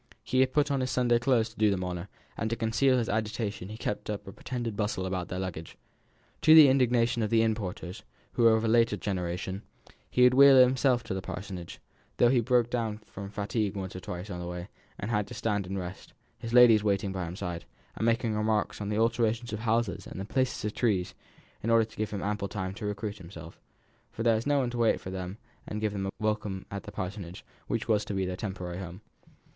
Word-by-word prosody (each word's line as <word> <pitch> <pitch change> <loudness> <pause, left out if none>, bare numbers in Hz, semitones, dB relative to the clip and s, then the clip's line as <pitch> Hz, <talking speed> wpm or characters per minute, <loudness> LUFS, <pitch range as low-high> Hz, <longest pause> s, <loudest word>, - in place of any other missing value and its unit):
He 130 - 0
had 130 0 +4
put 150 +1 +2
on 140 - +1
his 130 0 -1
Sunday 120 -2 +2
clothes 120 -2 +2
to 115 - -19
do 110 -1 +3
them 95 -2 0
honour; 90 0 -4 0.3
and 110 - -2
to 115 - -1
conceal 120 +4 +2
his 115 -3 0
agitation 105 -2 -2
he 110 - -7
kept 105 -2 -4
up 105 -2 -4
a - - -6
pretended 120 -2 -4
bustle 105 -3 -1
about 95 -1 -2
their 90 - -5
luggage. 90 -4 -5 0.6
To 155 0 +7
the 155 -3 +10
indignation 120 -3 +2
of 105 - 0
the 115 -1 +4
inn 110 -1 +2
porters, 90 -4 -6 0.3
who - - -2
were 115 -1 +7
of 110 +1 0
a - - +2
later 115 +1 +3
generation, 95 0 -3 0.5
he 125 - +3
would 125 0 +7
wheel 140 0 +8
it 130 - +10
himself 125 -1 +2
to 115 - -4
the 95 - -3
Parsonage, 95 -2 -7 0.4
though 120 - +5
he 125 0 +4
broke 120 0 +2
down 115 -3 -1
from 100 0 -8
fatigue 105 0 -2
once 95 -2 -5
or - - -4
twice 90 +2 -6
on 90 - -5
the 90 - -5
way, 90 +1 -6 0.3
and 105 - -4
had 105 -2 0
to 120 - -9
stand 105 -4 -1
and 95 +1 -3
rest, 90 -1 -7 0.3
his 115 0 -6
ladies 120 -3 +7
waiting 100 -1 +1
by 90 -3 -3
his 90 - -8
side, 85 -5 -5 0.3
and - - -4
making 115 -1 +1
remarks 105 0 0
on 100 - -3
the 105 - -1
alterations 115 0 +1
of 105 - -3
houses 115 -3 0
and - - -8
the 95 - -4
places 130 0 -1
of 105 - -2
trees, 100 -7 0 0.5
in 115 - -2
order 115 -1 +5
to 110 - -17
give 110 -1 -1
him 100 -2 -4
ample 105 -1 -1
time 95 -2 -4
to 105 +1 -5
recruit 105 +1 -4
himself, 85 -2 -11 0.5
for 115 - -4
there 115 -1 +4
was 110 +4 -1
no 145 0 +3
one 125 -3 0
to 120 - -4
wait 115 -1 +3
for 95 - -7
them 95 +1 -5 0.3
and 105 - -4
give 105 -1 -1
them 95 -1 -2
a - - -3
welcome 105 -3 -2
to 100 - -3
the 105 +1 -10
Parsonage, 95 -2 -6 0.2
which - - -2
was 110 -2 +2
to 105 -1 -4
be 95 -1 0
their 90 0 -3
temporary 90 -3 -5
home. 90 +1 -8
105 Hz, 240 wpm, -29 LUFS, 95-115 Hz, 0.6 s, the